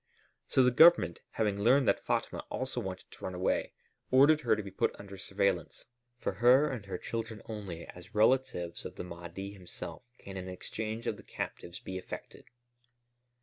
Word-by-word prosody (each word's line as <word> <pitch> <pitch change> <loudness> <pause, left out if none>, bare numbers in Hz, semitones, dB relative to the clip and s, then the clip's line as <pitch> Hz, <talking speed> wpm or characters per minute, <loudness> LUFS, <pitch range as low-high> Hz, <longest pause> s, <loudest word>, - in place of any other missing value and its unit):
So 130 - +4
the 125 - +5
Government, 125 - +6
having 105 -2 0
learned 125 +4 +5
that - - +2
Fatma - - -1
also 130 -1 -2
wanted 95 -3 -6
to - - -15
run 95 - -3
away, 90 +1 0 0.4
ordered 145 +4 +6
her 115 -5 +3
to 105 - -4
be 100 - -8
put 95 - 0
under 100 -1 -9
surveillance. 95 -1 -1 0.3
For - - -1
her 125 +9 +5
and 110 -6 -6
her 95 - -3
children 115 -1 -4
only, 100 -7 -6
as 90 +5 -12
relatives 105 -7 +2
of - - -7
the - - -5
Mahdi 90 +3 -7
himself, 95 -3 -8 0.2
can 95 -1 -9
an 95 0 -5
exchange 110 +4 -5
of - - -1
the - - -13
captives 85 +1 -6
be 95 0 -5
effected." - - -9
100 Hz, 175 wpm, -32 LUFS, 95-120 Hz, 0.4 s, Government